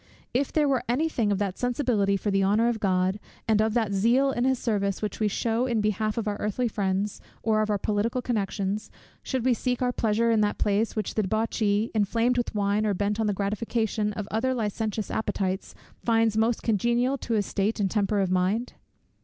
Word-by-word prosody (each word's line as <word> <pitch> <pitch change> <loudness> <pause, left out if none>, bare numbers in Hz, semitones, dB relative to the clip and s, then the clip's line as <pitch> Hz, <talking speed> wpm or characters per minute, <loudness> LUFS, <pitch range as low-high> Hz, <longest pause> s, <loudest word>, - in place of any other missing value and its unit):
If 265 +3 0
there 300 -2 +2
were 265 -3 +2
any 280 +7 +2
thing 230 -9 0
of 200 - +1
that 195 -2 -2
sensibility 240 -6 +1
for 205 +1 -2
the 195 0 +2
honour 210 +4 +3
of 230 -2 -2
God, 190 0 +1 0.3
and 215 -1 +3
of 220 +1 0
that 220 -4 +1
zeal 240 +8 +3
in 240 -1 0
his 260 0 +2
service, 200 -5 -1
which 210 -2 -4
we 215 - +2
shew 230 +4 0
in 235 -3 0
behalf 215 +1 0
of 225 -2 -2
our 205 -1 -1
earthly 215 +4 -1
friends, 200 -1 -1 0.2
or 215 -1 +2
of 215 - -1
our 205 - +2
political 210 +5 -1
connections, 205 -3 -2 0.3
should 260 -3 -2
we 255 - +4
seek 250 +1 -1
our 250 -1 +1
pleasure 230 0 +1
in 220 -1 +3
that 205 0 +1
place 210 +2 +1
which 215 - -2
the 215 - +1
debauchee, 215 +1 0
inflamed 230 +4 +1
with 240 - -3
wine, 205 +1 +1
or 210 -2 +1
bent 205 +3 -1
on 220 - +1
the - - +2
gratification 210 +1 -1
of 205 -1 -5
other 260 +4 0
licentious 215 -1 -2
appetites, 195 -3 -2 0.3
finds 225 -2 +2
most 225 +1 +1
congenial 240 +4 +1
to 235 - -3
his 205 -2 +1
state 205 +4 -1
and 195 -3 +1
temper 205 -1 +1
of 190 -2 0
mind? 190 +6 0
215 Hz, 210 wpm, -26 LUFS, 205-235 Hz, 0.3 s, we